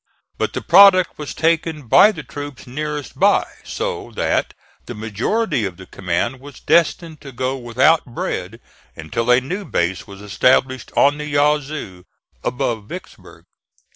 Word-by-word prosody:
But - - -1
the - - -4
product 185 -1 +6
was 150 - -6
taken 160 -1 0
by 210 - +7
the 155 -7 -8
troops 145 -2 -8
nearest 150 +2 -5
by, - - +4 0.2
so - - -4
that - - -1 0.3
the - - -6
majority 115 - -1
of 95 -3 -4
the 95 - -11
command 95 +10 -3
was 140 +1 -13
destined 165 -1 +1
to 140 -2 -10
go 130 +2 -2
without 130 +6 +2
bread 120 - -5 0.4
until 95 +10 -3
a 125 0 +6
new 180 +11 -5
base 90 - -2
was 100 -1 -11
established 130 +5 +1
on 145 +1 +4
the 150 - -5
Yazoo 145 -10 -1 0.4
above 120 -4 -2
Vicksburg. - - -11
135 Hz, 145 wpm, -19 LUFS, 115-155 Hz, 0.4 s, by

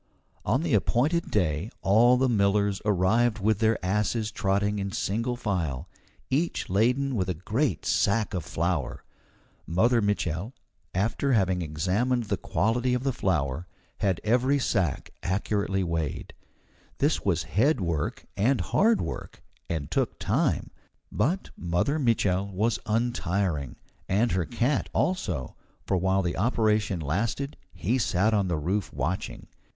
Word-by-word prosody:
On 130 +8 +1
the 170 - 0
appointed 140 - +2
day 90 -1 0
all 120 +6 +5
the 130 +1 +3
millers 100 -3 +2
arrived 105 +4 +2
with 105 0 +1
their 110 -1 +3
asses 105 +3 0
trotting 100 +1 0
in 100 0 -3
single 115 +7 -1
file, 90 - -2 0.4
each 155 - 0
laden 125 +7 +2
with 95 -4 -1
a 90 - -1
great 105 - -1
sack 105 +1 +1
of 90 -4 -2
flour. 85 -3 -2 0.6
Mother 115 +8 +3
Mitchel, 100 - -1 0.4
after 115 +8 +1
having 95 -5 +2
examined 95 +11 0
the 105 - -2
quality 125 +3 0
of 125 - -2
the 135 -1 0
flour, 85 - -1 0.3
had 95 -4 +1
every 125 +5 +3
sack 95 - -1
accurately 95 0 0
weighed. 80 -4 -3 0.6
This - - +1
was - - +1
head 130 +7 +2
work 85 -5 -2
and 120 +5 +2
hard 215 - +3
work, - - -6 0.3
and 80 -4 -3
took - - 0
time; - - 0 0.4
but 160 - 0
Mother 90 - 0
Mitchel 100 -6 +1
was 105 +4 0
untiring, 100 - -1 0.3
and 110 +5 +2
her 90 -2 +1
cat, 125 - 0
also, 90 - -1 0.3
for - - 0
while 95 +1 +2
the 85 - -2
operation 105 -4 +1
lasted 110 - -2 0.2
he 120 +8 -1
sat 105 0 +2
on 100 -3 +2
the 85 -3 0
roof 95 +7 -1
watching. 90 +5 -3
105 Hz, 135 wpm, -27 LUFS, 90-120 Hz, 0.6 s, all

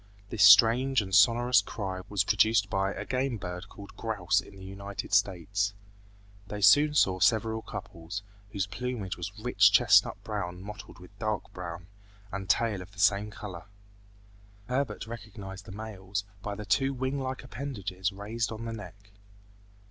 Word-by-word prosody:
This 110 - -2
strange 115 +7 +7
and 95 -3 -4
sonorous 120 +6 +5
cry 95 -4 -5
was 100 -3 +1
produced 105 -1 +3
by 95 0 +1
a - - -6
game 130 -2 -1
bird 90 0 -7
called 100 0 -12
grouse 105 -6 0
in 100 - -15
the 95 - -12
United 100 +1 -7
States. 100 +1 +1 0.7
They 105 - -5
soon 150 +9 +6
saw 95 -9 +3
several 110 +3 +2
couples, 85 0 -7 0.3
whose 100 -2 -1
plumage 110 -2 -4
was 90 +2 -5
rich 105 -3 +4
chestnut 105 -2 +5
brown 90 -5 -4
mottled 105 0 -9
with 90 +2 -15
dark 110 -2 -3
brown, 85 -1 -7 0.5
and 95 -1 -5
tail 110 -2 +2
of 95 +2 -12
the 100 - -13
same 100 +2 +3
color. 100 -6 -8 1.0
Herbert 130 -1 -2
recognized 100 -3 -9
the - - -10
males 100 -1 -5 0.2
by 105 0 -4
the 105 0 -7
two 135 +7 +1
wing 130 +2 -2
like 130 0 -4
appendages 100 -8 -4
raised 105 +3 -3
on 115 +1 -6
the 115 - -4
neck. 100 -1 -11
100 Hz, 155 wpm, -29 LUFS, 95-115 Hz, 1.0 s, strange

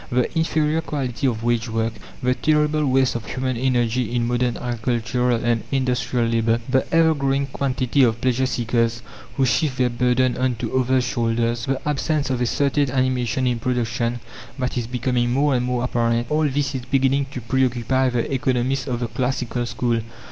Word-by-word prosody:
The 125 +6 0
inferior 160 -1 +1
quality 135 -4 -2
of 115 -3 -2
wage 120 0 0
work, 115 0 -1 0.3
the 125 0 +3
terrible 150 +2 +1
waste 130 0 +3
of 115 -1 -5
human 130 -1 -2
energy 120 -1 0
in 120 -1 +1
modern 120 0 0
agricultural 120 0 0
and 120 -1 +2
industrial 125 -2 0
labour, 115 0 +1
the 130 0 0
ever 165 -1 +4
growing 140 -1 0
quantity 135 0 0
of 115 -3 +3
pleasure 130 +1 +1
seekers, 115 -1 0 0.3
who 135 - +3
shift 130 +2 +1
their 125 -1 +2
burden 125 +1 +1
on 130 -1 0
to 115 - -4
others' 130 0 +2
shoulders, 115 0 -1
the 135 +2 -2
absence 150 -1 0
of 125 -1 -1
a 125 - +2
certain 140 +1 +1
animation 130 -1 0
in 120 -2 0
production 120 0 -1 0.4
that 125 -1 -2
is 120 -2 -2
becoming 125 0 0
more 140 +3 +2
and 125 -1 0
more 125 -1 -1
apparent; 120 -1 +1
all 155 0 +2
this 140 +1 -1
is 130 - -3
beginning 135 +1 +1
to 130 - -6
preoccupy 130 +1 +1
the 120 +2 -2
economists 130 +1 0
of 125 -2 -2
the 120 - -1
"classical" 125 0 -2
school. 115 -1 0
125 Hz, 175 wpm, -22 LUFS, 120-135 Hz, 0.4 s, ever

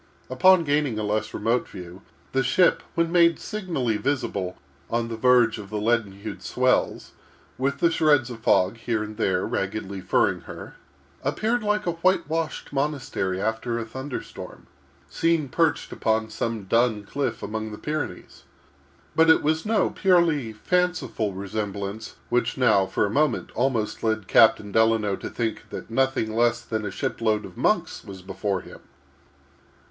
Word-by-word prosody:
Upon 175 +7 +5
gaining 145 -5 0
a 110 - -2
less 105 +1 -1
remote 120 +2 0
view, 90 +1 -10 0.3
the 135 - +2
ship, 150 +7 +3
when 170 -1 +1
made 170 -1 +5
signally 165 - -2
visible 105 -9 -2 0.3
on 115 0 -1
the 115 - -4
verge 120 -1 +4
of 100 -2 -9
the 110 - -3
leaden 110 -2 +1
hued 100 - -8
swells, - - 0 0.5
with 140 +2 0
the 170 +3 +3
shreds 145 -6 +3
of 115 - -8
fog 100 -1 +2
here 115 -1 -1
and 105 0 -7
there 95 -5 +1
raggedly 95 -1 -3
furring 90 - +1
her, - - -9 0.5
appeared 220 - 0
like 210 0 0
a 175 - +1
white 185 +3 +1
washed 160 -1 -3
monastery 135 -10 -1
after 110 +3 -1
a 115 - -3
thunder 130 +4 -6
storm, - - -11 0.4
seen 165 -3 +1
perched 160 +3 +1
upon 110 0 0
some 115 -1 -3
dun 115 +1 +1
cliff 130 +3 -3
among 110 0 -4
the 105 - -7
Pyrenees. 150 +4 -5 0.7
But 160 0 +5
it 160 - +6
was 160 +5 0
no 220 0 +2
purely 170 - +2
fanciful 175 - 0
resemblance 100 +2 -5
which 120 -1 0
now, 110 -7 +4
for - - +1
a 100 - -3
moment, 145 0 +1
almost 120 -3 -1
led 110 -3 -1
Captain 110 -2 +5
Delano 110 -2 +3
to - - -6
think 115 -2 -3
that - - -8
nothing 130 -3 0
less 120 0 +2
than 110 -2 -3
a - - -2
ship 95 - -4
load 110 -2 +1
of - - -11
monks - - 0
was 95 -2 -10
before 95 0 -2
him. - - -12
115 Hz, 160 wpm, -25 LUFS, 105-150 Hz, 0.7 s, it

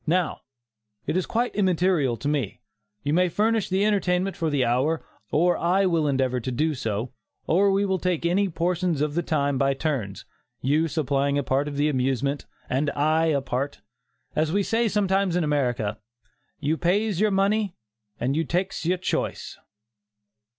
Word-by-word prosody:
Now, 175 0 +1 0.6
it - - -1
is 185 - 0
quite 240 +2 0
immaterial 180 - +2
to 145 - -4
me; 140 -8 -1 0.4
you 145 - 0
may 180 +2 +3
furnish 220 +3 +1
the 190 +2 +2
entertainment 195 -2 +1
for 165 - -1
the 140 -4 +1
hour, 130 +7 +1 0.3
or 175 +3 +3
I 185 +3 +2
will 165 -4 +2
endeavor 130 -2 +1
to 130 +2 -4
do 155 +6 +1
so, 115 -1 -3 0.3
or 195 +5 +3
we 195 +1 +2
will 190 -1 0
take 180 -3 -1 0.3
portions 170 -2 0
of 150 -1 0
the 170 - +1
time 145 -5 0
by 135 0 +2
turns 130 - -3 0.3
you 150 +5 +2
supplying 140 -2 0
a 145 - 0
part 135 +3 0
of 145 -1 -5
the 145 +1 +2
amusement, 135 0 -1 0.2
and 140 +3 0
I 155 +3 +2
a 145 -3 +2
part; 135 +2 -3 0.5
as 155 0 +1
we 200 +3 +2
say 230 +3 +1
sometimes 195 -3 +1
in 180 - +2
America, 120 -8 0 0.6
'you 155 +2 0
pays 195 +2 +1
your 215 +1 +3
money, 200 0 +1 0.4
and 130 +3 0
you 160 - +1
takes 180 +4 -2
your 180 +3 +1
choice. 180 - -3
160 Hz, 170 wpm, -25 LUFS, 140-185 Hz, 0.6 s, may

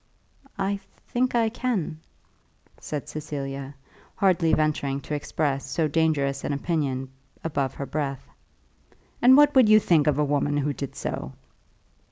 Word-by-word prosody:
"I 200 0 -1 0.3
think 250 0 0
I 230 -2 +3
can," 220 -10 -2 0.8
said 150 -2 -5
Cecilia, 140 -2 -5 0.4
hardly 180 -4 +3
venturing 150 -3 +1
to 150 - -6
express 140 -2 -2
so 160 +3 +1
dangerous 145 -3 +1
an 145 - -1
opinion 140 -4 -2 0.3
above 140 -4 -2
her 140 - -4
breath. 140 -2 -3 0.9
"And 255 +2 +8
what 290 0 +6
would 255 -5 +6
you 215 0 +8
think 160 -7 +3
of 145 -2 +3
a 150 - +2
woman 145 0 0
who 145 0 0
did 140 -1 -6
so?" 65 - -4
150 Hz, 140 wpm, -25 LUFS, 140-185 Hz, 0.9 s, And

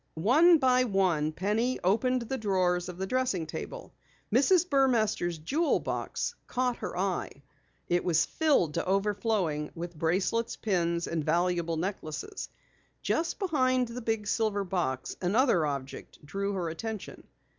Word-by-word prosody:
One 300 - +5
by 255 -3 +3
one 180 -8 +1
Penny 215 +9 0
opened 245 +7 +2
the 265 +3 -4
drawers 185 -4 +1
of 180 - -8
the 190 - -2
dressing 250 -7 0
table. - - -7 0.4
Mrs. 350 +8 +4
Burmaster's 230 - +2
jewel 295 - +1
box - - -3
caught 250 -1 0
her - - -5
eye. 180 -7 -2 0.4
It 175 0 +1
was 160 -3 +3
filled 285 - +2
to 170 - -1
overflowing 195 -6 0
with 175 +1 -6
bracelets, 185 +9 0
pins, 170 -4 0
and 165 -2 -2
valuable 170 +1 +1
necklaces. 185 - -4 0.5
Just 335 +1 0
behind 255 - +1
the 245 +2 -6
big 225 -2 -1
silver 205 -1 0
box, 175 -9 -2
another 190 - +3
object 140 +1 -6
drew 200 +6 -2
her 180 -3 -2
attention. 215 +5 -6
195 Hz, 135 wpm, -29 LUFS, 170-250 Hz, 0.5 s, One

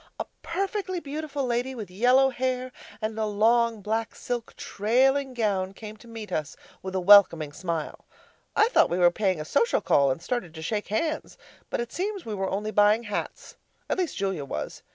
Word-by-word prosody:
A - - -2 0.2
perfectly 380 +1 -2
beautiful 290 -2 -4
lady 245 +2 -1
with 210 -6 -7
yellow 250 +7 +4
hair 255 0 -2 0.3
and 220 0 -2
a 215 - 0
long 225 +1 +2
black 220 +2 -2
silk 240 -2 -5
trailing 260 +5 +1
gown 195 -5 0
came 215 +1 -9
to 235 - -16
meet 225 -2 -8
us 155 0 -3 0.2
with 190 0 -6
a - - +2
welcoming 175 -6 +6
smile. 170 -2 -4 0.5
I 435 - +4
thought - - +4
we 175 - -1
were 175 -1 +5
paying 190 -3 0
a 155 - -5
social 465 - +2
call, 140 -1 +3
and 130 - -1
started 185 -5 -4
to 160 - -7
shake 210 +4 -2
hands, 310 +9 -2 0.3
but - - -2
it 235 0 -6
seems 395 0 -3
we 220 - -4
were 195 -1 -2
only 210 +3 -2
buying 210 +2 +4
hats 205 -2 -5 0.3
at - - 0
least 360 -3 -1
Julia 190 -6 -1
was. 140 - -5
220 Hz, 190 wpm, -26 LUFS, 190-260 Hz, 0.5 s, welcoming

